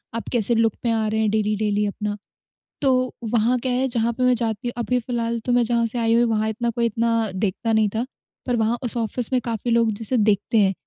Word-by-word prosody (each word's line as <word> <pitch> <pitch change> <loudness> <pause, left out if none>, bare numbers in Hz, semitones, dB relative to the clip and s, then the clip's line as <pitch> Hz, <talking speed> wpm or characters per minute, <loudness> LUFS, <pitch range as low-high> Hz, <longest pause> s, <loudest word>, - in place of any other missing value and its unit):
आप 230 - -4
कैसे 235 -1 +2
लुक 225 -1 +2
में 235 - +2
आ 220 -1 0
रहे 220 +1 -1
हैं 215 - +2
डेली-डेली 210 -1 0
अपना। 205 0 -3 0.6
तो 255 -2 +2 0.2
वहाँ 235 +2 +3
क्या 255 +1 -2
है 255 +2 +1
जहाँ 235 -2 0
पे 255 +2 -2
मैं 250 0 +4
जाती 225 -1 -2
हूँ 240 - -3
अभी 250 +2 0
फ़िलहाल 235 -1 -2
तो 250 - 0
मैं 245 0 +4
जहाँ 235 0 +1
से 230 - -1
आई 230 -1 +2
हुई 235 +1 +4
वहाँ 220 -2 +1
इतना 235 +2 -2
कोई 235 0 -1
इतना 230 -1 0
देखता 210 +3 -1
नहीं 220 -1 +3
था। 230 +3 0 0.4
पर 245 - +1
वहाँ 225 +1 +1
उस 245 - +1
ऑफिस 230 +1 -1
में 255 - +3
काफ़ी 235 0 -2
लोग 230 -1 +3
जिसे 225 +4 -1
देखते 210 0 +1
हैं 195 -2 +4
230 Hz, 240 wpm, -22 LUFS, 220-240 Hz, 0.6 s, मैं